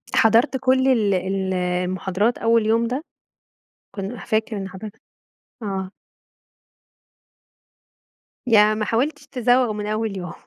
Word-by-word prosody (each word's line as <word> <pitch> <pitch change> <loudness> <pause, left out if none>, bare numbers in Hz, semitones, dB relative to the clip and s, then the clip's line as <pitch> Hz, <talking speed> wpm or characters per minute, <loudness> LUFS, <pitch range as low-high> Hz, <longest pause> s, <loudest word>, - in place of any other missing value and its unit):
حضرت 230 +4 +4
كُلّ 260 0 +2
ال 215 -6 +3
ال 190 +1 -1
المحاضرات 185 +4 -1
أول 230 -1 +2
يوم 230 +1 +2
ده؟ 260 +6 -3 0.9
كن 200 +4 -5
فاكر 220 +1 -2
إن 195 0 -5
حضرت؟ 200 +3 -8 0.7
آه. 190 -2 -4 2.6
يعني 215 -2 +5
ما 215 - 0
حاولتش 280 +6 -1
تزوّغ 245 -2 +2
من 210 0 -5
أول 215 -2 -2
يوم. 180 -2 -6
215 Hz, 115 wpm, -22 LUFS, 190-235 Hz, 2.6 s, يعني